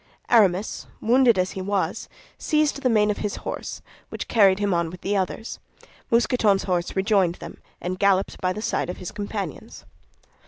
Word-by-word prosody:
Aramis, 205 -4 +2
wounded 240 -1 +4
as 185 0 0
he 190 - -5
was, 200 0 -2 0.3
seized 305 -2 +1
the 255 - +2
mane 210 -2 +3
of 205 - -4
his 210 - -2
horse, - - -5 0.3
which - - -6
carried 195 -4 +5
him 205 -1 0
on 170 -1 0
with 180 +2 -11
the 205 - -1
others. 195 +4 -3 0.5
Mousqueton's 230 -4 +3
horse 175 -2 -1
rejoined 190 -3 +2
them, - - -10 0.2
and 185 +1 -4
galloped 195 -1 +1
by 185 - +1
the 215 +3 -5
side - - -1
of 180 - -5
his 180 - -7
companions. 200 -6 -6
200 Hz, 170 wpm, -24 LUFS, 185-220 Hz, 0.5 s, carried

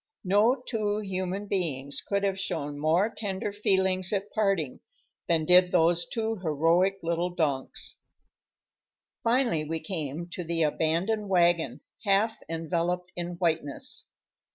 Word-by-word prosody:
No 205 +6 +4
two 210 -3 -1
human 190 0 -3
beings 150 -9 -2
could 200 0 -1
have 195 -1 0
shown 145 -6 -3
more 165 +7 +3
tender 200 -2 -4
feelings 190 -2 +1
at 200 -1 -2
parting 195 - 0 0.5
than 165 -2 +3
did 180 +1 +6
those 170 +1 +3
two 225 -1 -2
heroic 170 +3 +2
little 170 +1 0
donks. 150 -6 -2 1.2
Finally 235 - +2
we 160 +1 -2
came 160 -1 -3
to 180 0 -5
the 165 0 0
abandoned 170 +8 0
wagon, 175 -3 +2 0.2
half 210 +2 +2
enveloped 170 +2 -2
in 175 0 -4
whiteness. 160 -5 -1
180 Hz, 125 wpm, -28 LUFS, 165-200 Hz, 1.2 s, did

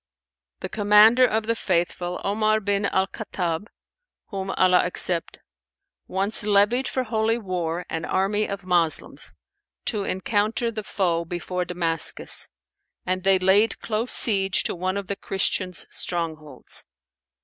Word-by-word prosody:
The - - -5
Commander 215 +4 +5
of 220 -1 -1
the 230 - +1
Faithful, 175 -3 -2
Omar 215 +2 +1
bin 200 -1 0
al 190 -1 +1
Khattαb 185 -3 -4 0.6
(whom 195 -2 -5
Allah 185 -1 +4
accept!), 180 -1 0 0.7
once 195 +4 +3
levied 210 +5 +3
for 260 - -2
holy 225 0 0
war 180 -5 -3
an 160 0 -4
army 205 +3 0
of 200 -1 -6
Moslems, 175 -3 0 0.5
to 210 -3 -1
encounter 210 +5 -1
the 220 -1 -4
foe 175 -5 -1
before 180 +1 -4
Damascus, 165 -2 0 0.6
and 185 0 -2
they 195 0 +4
laid 190 +4 +3
close 225 +2 -2
siege 195 -4 +3
to - - -1
one 185 +2 -2
of 200 - -4
the 200 - -3
Christians' 185 -2 -1
strongholds. 160 -3 -3
195 Hz, 130 wpm, -24 LUFS, 180-215 Hz, 0.7 s, Commander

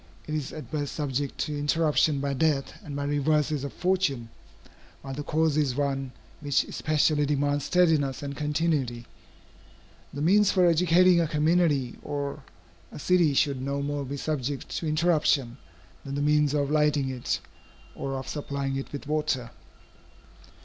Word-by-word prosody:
It 155 - -5
is 150 -3 -3
at 155 - -9
best 145 -3 -2
subject 140 -2 -2
to 150 - -2
interruption 150 0 +2
by 140 0 -1
death 140 0 0
and 145 -5 -7
by 140 - -2
reverses 145 0 +1
of 140 - -4
fortune, 180 -11 0 0.7
while 135 - -6
the 145 - -4
cause 155 +1 +1
is 140 -5 +1
one 135 -2 -1 0.3
which 145 -2 +1
especially 155 -1 +1
demands 145 0 0
steadiness 155 -6 +2
and 140 0 -5
continuity. 150 -6 -1 1.1
The 145 - -4
means 200 +4 +5
for 185 -2 +3
educating 175 +1 +5
a 165 - +1
community 150 -4 +1
or 145 -1 -4 0.5
a - - -9
city 170 -2 +2
should 135 -2 +1
no 140 +1 -2
more 145 0 -2
be 140 +1 -5
subject 140 -2 -3
to 165 - -3
interruption, 155 -6 +2 0.5
than 140 0 -5
the 145 - -1
means 150 0 +3
of 145 -1 0
lighting 150 -3 +2
it, 125 -7 -2 0.5
or 135 0 -4
of 130 - -6
supplying 140 -2 -3
it 135 - -6
with 145 - -6
water. 150 -5 -1
145 Hz, 155 wpm, -27 LUFS, 140-155 Hz, 1.1 s, means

